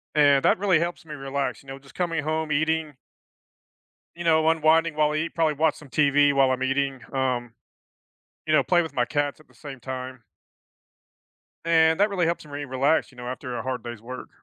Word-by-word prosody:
And 145 -2 +4
that - - +4
really 190 -6 +3
helps 170 -1 -3
me 150 -1 -8
relax, 135 0 -3
you - - -23
know, 135 0 -7
just 135 0 -19
coming 165 -4 -1
home, 155 0 -2
eating 155 0 0 1.2
you 175 - -6
know, 160 -1 +3
unwinding 160 0 +3
while 150 -1 +2
I - - -2
eat, 165 +2 -2
probably 160 -3 +1
watch 155 0 +2
some 145 - -14
TV 145 0 +3
while 135 -1 +3
I'm 130 0 -2
eating, 135 0 0
um, 125 -3 -2 0.9
you 155 - 0
know, 155 - +5
play 175 -1 +3
with 160 - -7
my 120 - +2
cats 145 +1 -2
at - - -21
the - - -24
same 140 -4 -10
time. 130 0 -7 1.4
And 160 0 +4
that 205 +1 +4
really 180 -4 0
helps 170 -1 -2
me 145 0 -6
relax, 135 +4 +1
you 125 - -21
know, 125 0 -7
after 125 -1 -5
a - - -3
hard 130 -2 -4
day's 120 -2 -8
work. 125 +2 -8
145 Hz, 205 wpm, -25 LUFS, 130-160 Hz, 1.4 s, know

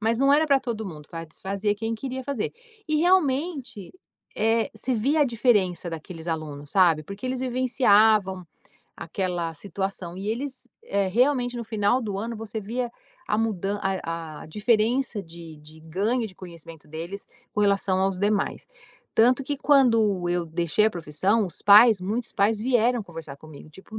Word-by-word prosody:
Mas 225 +2 +1
não 275 +1 +4
era 305 +2 +4
para 275 -2 +4
todo 225 -3 -4
mundo, 150 -4 -10 0.3
fazia 200 +2 -1
quem 225 +2 -3
queria 260 +3 -5
fazer. 260 -4 -3 0.3
E 305 0 +1
realmente, 295 - +1 0.5
eh, 225 +1 +1
você 260 - -2
via 280 +8 +1
a - - +6
diferença 215 -8 +1
daqueles 165 0 -8
alunos, 150 -3 -5
sabe, 170 -5 +4
porque 200 - -9
eles 255 0 -2
vivenciavam 220 -7 +3 0.5
aquela 175 -1 -3
situação 190 0 -5
e 195 +2 -6
eles, 255 +3 -4 0.2
eh, 200 -1 0
realmente 245 +3 +2
no 235 -1 -4
final 215 +2 +1
do 210 -5 -4
ano 230 +4 -4
você 220 0 -6
via 240 +4 -3 0.4
a 210 - +2
mudança, 205 -2 -1
a 165 -5 -3
a - - -10
diferença 220 +4 +1
de 165 -2 -11
de 155 +1 -16
ganho 205 +9 -1
de 190 - -13
conhecimento 165 -3 -12
deles 170 +6 -7 0.3
com 210 - -1
relação 195 -2 +2
aos 190 -1 0
demais. 205 0 0 0.5
Tanto 250 +4 +4
que 290 0 -2
quando 225 -10 +3
eu 175 -1 -1
deixei 170 +5 +1
a - - +2
profissão, 185 +6 0
os 175 - -7
pais, 210 +1 +7
muitos 220 +6 -3
pais 210 +2 +2
vieram 240 0 +2
conversar 165 -6 -9
comigo, 155 0 -13
tipo: 190 +7 -11
205 Hz, 165 wpm, -25 LUFS, 175-240 Hz, 0.5 s, pais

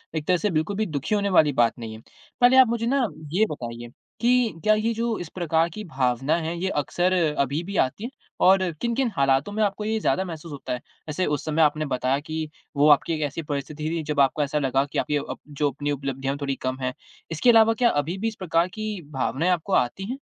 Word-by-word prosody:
एक 155 -1 -3
तरह 180 -1 +4
से 210 - 0
बिल्कुल 160 +5 -1
भी 220 - +1
दुखी 155 +6 -2
होने 200 -1 0
वाली 150 -3 +3
बात 115 - +2
नहीं 110 -1 -6
है। 110 - -12 0.4
पहले 250 +2 +6
आप 260 -2 +8
मुझे 230 0 -1
ना 265 0 +2 0.3
ये 215 +4 +4
बताइए 120 -3 -6 0.3
कि 240 -8 +2
क्या 215 0 +5
ये 220 +2 0
जो 230 0 -1
इस 175 -3 -6
प्रकार 165 -1 +1
की 210 +6 -7
भावना 135 - 0
है, 165 +1 -3
ये 190 - 0
अक्सर 175 +5 0 0.3
अभी 140 +4 0
भी 200 +1 -5
आती 130 +12 0
है? 240 - -3 0.3
और 190 +1 +6 0.2
किन-किन 240 +1 0
हालातों 135 +5 +2
में 215 - -1
आपको 210 +1 -1
ये 220 0 0
ज़्यादा 190 -2 +1
महसूस 165 -2 -8
होता 140 -3 -5
है? 125 - -4 0.3
ऐसे 180 +5 -1
उस 150 +1 -2
समय 155 +1 +1
आपने 155 0 +3
बताया 130 0 0
कि 155 0 -5 0.3
वो 145 +2 +5
आपकी 150 +3 +4
एक 155 - -3
ऐसी 155 +4 -6
परिस्थिति 145 +1 -5
थी 165 -1 -2
जब 150 -1 -2
आपको 140 +2 +3
ऐसा 150 +1 -1
लगा 135 0 +1
कि - - -4
आप - - -3
ये 150 - +3
अप - - -5
जो 145 0 0
अपनी 145 +2 -3
उपलब्धियाँ 135 0 -3
थोड़ी 140 -1 -1
कम 130 0 -2
हैं। 130 0 -1 0.4
इसके 160 +10 +2
अलावा 225 -1 +6
क्या 240 +1 +3
अभी 150 +6 -1
भी 225 +3 -2
इस 220 - -3
प्रकार 170 -1 +1
की 215 -1 -5
भावनाएँ 140 +5 0
आपको 180 +3 -1
आती 125 +11 +1
हैं? 265 - -4
160 Hz, 235 wpm, -24 LUFS, 140-205 Hz, 0.4 s, आप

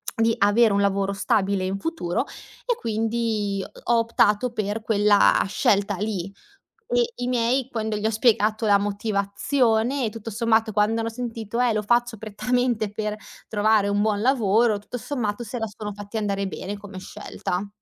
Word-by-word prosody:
di 225 0 +2
avere 205 +2 +4
un 200 - +2
lavoro 200 0 +1
stabile 195 -1 +1
in 190 +1 -2
futuro 270 - -2 0.4
e 485 - +1
quindi 220 -3 -1 0.2
ho 235 0 +3
optato 230 +1 +2
per 215 0 -2
quella 210 -2 +4
scelta 200 0 +1
lì. 200 -3 -3 0.6
E 485 -1 +2
i - - -1
miei 250 +1 +1
quando 220 -2 -2
gli 210 0 -3
ho - - +3
spiegato 220 -1 +2
la 200 -1 +6
motivazione 220 +5 0
e - - 0
tutto 225 0 -7
sommato 225 0 +1
quando 210 +2 +2
hanno 225 0 -1
sentito: 230 -1 -5
"Eh, 245 -2 +3
lo 215 - 0
faccio 240 +2 +1
prettamente 220 +1 -1
per 210 0 -3 0.3
trovare 215 -1 +2
un 200 0 +1
buon 210 -1 +1
lavoro", 230 -3 +3
tutto 210 +4 -7
sommato 235 -4 -3
se 235 +2 -6
la 225 - -2
sono 210 0 -6
fatti 205 +2 -7
andare 200 -2 -1
bene 195 +2 -5
come 200 -2 -9
scelta. 185 +1 -5
215 Hz, 165 wpm, -24 LUFS, 205-230 Hz, 0.6 s, la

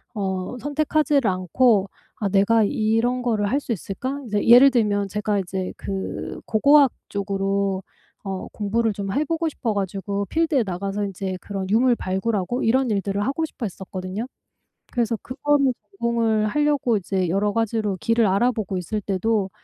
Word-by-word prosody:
어 190 +2 -3
선택하지를 290 -2 +1
않고 195 +3 +2 0.3
'아 205 - 0
내가 205 +3 +4
이런 225 +4 +1
거를 220 -4 0
할 275 - +2
수 275 - -6
있을까?' 255 - -5
이제 210 -1 -1
예를 250 +4 +9
들면 205 -5 +1
제가 210 0 -1
이제 185 0 -4
그 195 -1 -5
고고학 280 +4 +5 0.2
쪽으로 195 -1 -1 0.4
어 190 -1 -4
공부를 220 +2 0
좀 195 -1 -4
해 295 +6 +1
보고 330 +1 -1
싶어 235 -7 -2
가지고 200 0 -2
필드에 320 - +1
나가서 195 +2 -3
인제 190 -1 -4
그런 195 -2 -5
유물 240 +4 +4
발굴하고 195 +3 -1
이런 255 +3 +2
일들을 200 0 -1
하고 280 +5 -1
싶어 275 -5 -6
했었거든요. 190 +2 -5 0.7
그래서 235 -2 0
그거를 275 +1 +1 0.3
전공을 225 -2 +1
하려고 290 -3 +1
이제 190 -2 -1
여러 200 +4 +1
가지로 220 -2 0
길을 230 -1 +2
알아보고 205 0 +1
있을 195 +4 -3
때도 200 +1 0
210 Hz, 335 characters per minute, -23 LUFS, 195-245 Hz, 0.7 s, 예를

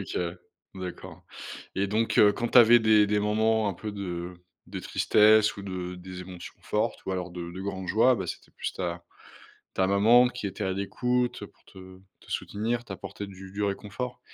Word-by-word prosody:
OK - - -6
ouais. 85 0 -2 0.4
D'accord 90 -1 -8 0.5
et 100 +1 0
donc, 110 +3 0
heu, 105 - +8
quand 120 - -2
tu 125 - +6
avais 120 0 +8
des 110 -2 +5
des 105 0 +2
moments 110 +1 +2
un 95 - -3
peu 105 +4 -6
de 90 -3 -5 0.3
de - - -5
tristesse 110 0 +4
ou 100 - -7
de 90 -2 -5
des 90 0 -9
émotions 90 -1 -9
fortes - - -2
ou - - -2
alors 90 -1 -3
de 85 -1 -6
de 90 +2 -8
grande 95 -2 -5
joie, 115 +7 +4
bah, 95 -6 -4
c'était - - -8
plus - - -4
ta 85 -1 -4 0.7
ta 95 - +2
maman 115 +5 +6
qui 125 -3 -5
était 100 +2 -5
à 95 - 0
l'écoute 125 +6 -1
pour - - -26
te 95 0 -13 0.2
te - - -18
soutenir, 115 +3 -2
t'apporter 100 0 -7
du 95 0 -11
du 105 +1 -3
réconfort? 105 +5 -4
100 Hz, 190 wpm, -27 LUFS, 95-110 Hz, 0.7 s, heu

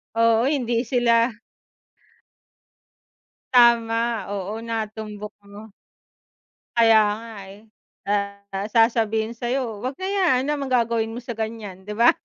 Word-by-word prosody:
Oo, 230 +1 +3
hindi 245 -4 0
sila 235 -1 +2 2.2
Tama, 235 -2 +4
oo 205 +3 -4
natumbok 215 -2 -5 0.2
mo. 210 +1 -11 1.0
Kaya 225 -1 +6 0.2
nga, 230 0 -10 0.2
eh. 200 +2 -13 0.4
Ah, 200 0 -3
sasabihin 225 -1 +2
sa'yo, 240 -2 -3
"Wag 255 +3 -3
na 375 - -5
yan. 355 -11 +2
'No 295 - 0
naman 275 - -3
gagawin 230 -3 +1
mo 245 - -7
sa 245 - -6
ganyan?" 215 -4 -6
'di 210 - -5
ba? 235 +1 +7
230 Hz, 120 wpm, -23 LUFS, 210-240 Hz, 2.2 s, ba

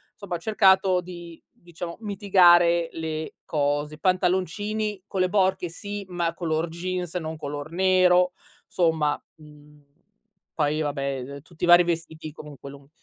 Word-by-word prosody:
insomma 200 -4 -5
ho - - -2
cercato 190 -2 +3
di, 175 -2 -11
diciamo, 170 0 -9
mitigare 175 -5 +4
le 160 -1 -5
cose. 145 0 -1
Pantaloncini 190 +3 -1
con 190 - -2
le 185 - +2
borchie 190 -2 +1
sì, 205 +4 -7
ma 170 -2 -1
color 165 -1 -2
jeans, 180 +1 -4
non 160 -2 -3
color 145 0 -6
nero, 180 0 +3 0.3
somma, 160 -4 +1 0.2
mhmm, 150 -1 -18 0.7
poi, 155 0 0
vabbè, 145 -2 -2 0.3
ehm, 140 0 -9
tutti 165 +2 -14
i - - -3
vari 175 0 +8
vestiti 160 -2 -4
comunque 145 -2 -11
lun 140 0 -15
170 Hz, 140 wpm, -25 LUFS, 155-185 Hz, 0.7 s, vari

